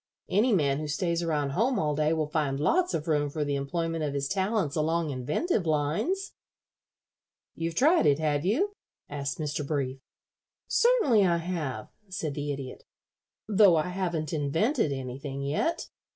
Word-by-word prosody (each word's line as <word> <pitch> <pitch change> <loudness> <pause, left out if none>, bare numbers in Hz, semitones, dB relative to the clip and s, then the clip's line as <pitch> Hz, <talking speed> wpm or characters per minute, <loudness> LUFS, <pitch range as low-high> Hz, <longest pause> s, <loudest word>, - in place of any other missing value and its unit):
Any 220 +6 +3
man 145 -8 +2
who 155 - -4
stays 170 +2 -1
around 150 -4 0
home 235 - +1
all 150 -1 0
day 155 +1 +1
will 160 -1 +1
find 145 -4 0
lots 355 - +2
of 155 - -3
room 145 -2 +1
for 150 +1 -2
the 145 - -1
employment 165 +3 -2
of 145 -2 -2
his 140 -1 -1
talents 195 -3 0
along 160 0 0
inventive 155 - -1
lines." 160 - 0 1.2
"You've 165 0 -3
tried 315 - +4
it, 140 -1 +4
have 150 -2 0
you?" 310 - +1 0.4
asked 140 -1 -3
Mr. 150 -1 -2
Brief. 140 -3 -2 0.7
"Certainly 360 - +4
I 170 -1 +2
have," 165 -10 -4 0.2
said 170 -6 -3
the 145 0 -3
Idiot, 135 -2 -6 0.6
"though 200 -4 +6
I 160 +3 0
haven't 175 -4 -2
invented 160 - +1
anything 135 +1 -5
yet. 155 - -1
155 Hz, 155 wpm, -28 LUFS, 145-190 Hz, 1.2 s, though